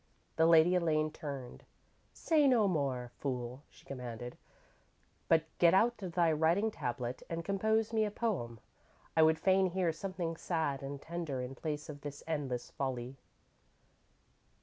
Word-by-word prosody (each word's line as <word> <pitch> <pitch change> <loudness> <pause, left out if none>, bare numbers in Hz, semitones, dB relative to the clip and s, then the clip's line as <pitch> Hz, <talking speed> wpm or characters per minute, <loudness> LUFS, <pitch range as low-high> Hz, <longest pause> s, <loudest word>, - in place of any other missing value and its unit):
_ 160 - +4
_The 165 - +6
Lady 165 +2 +6
Elaine 155 -3 +2
turned. 140 -5 -7 0.5
"Say 305 -3 +2
no 235 -6 +4
more, 135 -8 -1
fool," 125 -1 -3
she - - -20
commanded, 125 -2 -6 0.9
"but 160 -1 +4 0.2
get 170 +1 +6
out 235 +5 +3
thy 175 -3 +1
writing 165 +8 +2
tablet 125 - -4
and 165 0 -4
compose 220 +3 +1
me 220 -1 +3
a 210 - 0
poem. 175 - -2 0.6
I 160 - +5
would 160 0 +5
fain 190 +1 +3
hear 180 -2 0
something 170 -1 -4
sad 160 -7 -1
and 140 +1 -5
tender 165 -4 -4
in 125 +1 -4
place 150 +2 -4
of 145 -2 -8
this 145 -1 -7
endless 135 -6 -3
folly." 130 -1 -4
160 Hz, 150 wpm, -33 LUFS, 135-185 Hz, 0.9 s, The